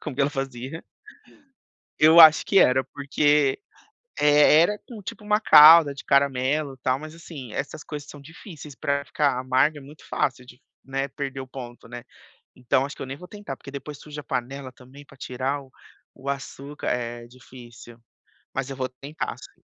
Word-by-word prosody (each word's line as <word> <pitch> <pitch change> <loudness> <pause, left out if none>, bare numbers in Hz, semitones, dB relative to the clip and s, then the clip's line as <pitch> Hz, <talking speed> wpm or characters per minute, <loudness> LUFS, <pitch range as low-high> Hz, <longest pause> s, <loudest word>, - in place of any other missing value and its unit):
como 150 - -6
que 140 - -3
ela 140 - +1
fazia. 135 +2 -6 1.2
Eu 160 +2 +7
acho 160 -1 +8
que 195 - +4
era, 130 +1 +4
porque, 145 0 +1 0.6
eh, 150 +1 +5
era 210 +4 0 0.3
tipo, 215 - -8
uma 210 0 +1
calda 155 -5 +8
de 140 - -9
caramelo 140 +1 +1
tal 130 +1 0
mas, 155 +2 -10
assim, 150 -8 -10
essas 145 +5 -5
coisas 150 -1 -8
são 145 - -11
difíceis, 155 -1 -12
para 140 +2 -2
ficar 145 -4 0
amarga. 130 +4 +1
É - - -12
muito 145 +3 -15
fácil 125 -2 -2
de, 125 - -15 0.2
né, 135 +1 -3
perder 135 0 -6
o 130 - -7
ponto, 125 -2 -10
né, 120 0 -9 0.5
então 125 +1 0
acho 140 - -8
que, - - -13
eu - - -4
nem 135 +1 -7
vou 180 - -12
tentar, 205 -10 -8
porque 140 - -12
depois 140 +1 -8
suja 150 0 -9
a - - -21
panela 130 +1 -5
também, 130 +3 -16
para 140 - -19
tirar 130 +2 -3
o 135 -1 -18 0.5
o 135 +1 -6
açúcar 140 +1 -6
é 120 -1 -3
difícil, 120 -1 -14 0.6
mas 135 0 -3
eu 135 - -7
vou 130 -1 -2
tentar 140 +4 -6
sim. - - -16
140 Hz, 180 wpm, -24 LUFS, 130-150 Hz, 1.2 s, acho